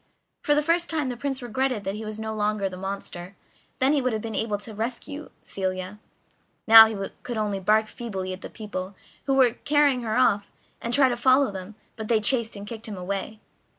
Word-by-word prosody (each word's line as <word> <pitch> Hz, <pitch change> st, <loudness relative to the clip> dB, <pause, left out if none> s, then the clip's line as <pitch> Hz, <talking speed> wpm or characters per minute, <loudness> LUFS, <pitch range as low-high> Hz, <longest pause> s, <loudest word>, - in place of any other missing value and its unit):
For 295 Hz, -, +2 dB
the 300 Hz, -, +2 dB
first 340 Hz, +2 st, +2 dB
time 305 Hz, -5 st, 0 dB
the 250 Hz, -, -3 dB
Prince 270 Hz, +1 st, -3 dB
regretted 245 Hz, -2 st, -1 dB
that 195 Hz, -, -2 dB
he 215 Hz, +2 st, -6 dB
was 215 Hz, 0 st, -6 dB
no 220 Hz, 0 st, -4 dB
longer 210 Hz, -1 st, 0 dB
the 185 Hz, -, -7 dB
monster, 190 Hz, -1 st, -6 dB, 0.4 s
then 265 Hz, +3 st, +3 dB
he 290 Hz, -, +2 dB
would 255 Hz, -2 st, 0 dB
have 215 Hz, -, -2 dB
been 225 Hz, -1 st, -5 dB
able 215 Hz, -1 st, -1 dB
to 205 Hz, +2 st, -7 dB
rescue 255 Hz, +7 st, -5 dB
Celia; 185 Hz, +1 st, -4 dB, 0.7 s
now 225 Hz, 0 st, +11 dB
he 200 Hz, -3 st, -4 dB
could 240 Hz, -2 st, -5 dB
only 210 Hz, -2 st, -1 dB
bark 215 Hz, +3 st, +3 dB
feebly 195 Hz, -5 st, -5 dB
at 185 Hz, -, -9 dB
the -, -, -7 dB
people 200 Hz, -3 st, -6 dB, 0.3 s
who 270 Hz, -, +1 dB
were 255 Hz, -4 st, +4 dB
carrying 290 Hz, -3 st, +3 dB
her 220 Hz, 0 st, -1 dB
off, 205 Hz, -5 st, +2 dB, 0.3 s
and 235 Hz, -, -3 dB
try 270 Hz, +1 st, +5 dB
to 245 Hz, -, 0 dB
follow 260 Hz, 0 st, +4 dB
them, 190 Hz, +2 st, -8 dB, 0.2 s
but 220 Hz, -1 st, -5 dB
they 225 Hz, -1 st, +3 dB
chased 225 Hz, +1 st, +1 dB
and 200 Hz, 0 st, -8 dB
kicked 225 Hz, +1 st, -7 dB
him 210 Hz, -3 st, -6 dB
away. 195 Hz, +4 st, -4 dB
220 Hz, 215 wpm, -25 LUFS, 200-255 Hz, 0.7 s, now